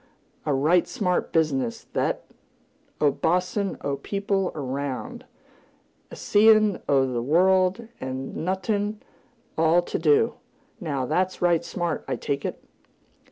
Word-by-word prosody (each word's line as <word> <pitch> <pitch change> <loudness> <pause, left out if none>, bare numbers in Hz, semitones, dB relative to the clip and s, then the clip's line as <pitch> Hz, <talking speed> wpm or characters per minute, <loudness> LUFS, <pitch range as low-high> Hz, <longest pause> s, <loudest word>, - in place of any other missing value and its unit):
A 150 - +2
right 160 +6 +3
smart 185 -8 -1
business, 135 -7 0
thet! - - -2 0.7
A 145 -1 +4
boss'n' 180 +6 0
o' 140 0 -2
people 195 +4 -1
'round, 140 -1 -4 0.8
a - - -9
seein' 215 -1 +4
o' 135 -2 +4
th' 120 -2 -2
world, 185 - +3
and 130 +1 -5
noth'n' 200 +4 -1
't 215 - -22 0.5
all 165 +2 +4
to - - -3
do! 160 +9 +3 0.5
Now, 145 - -2
that's 185 +7 0
right 170 -1 +3
smart, 175 -1 -3
I - - -1
take 140 0 -3
it!" - - -5
170 Hz, 125 wpm, -25 LUFS, 140-190 Hz, 0.8 s, A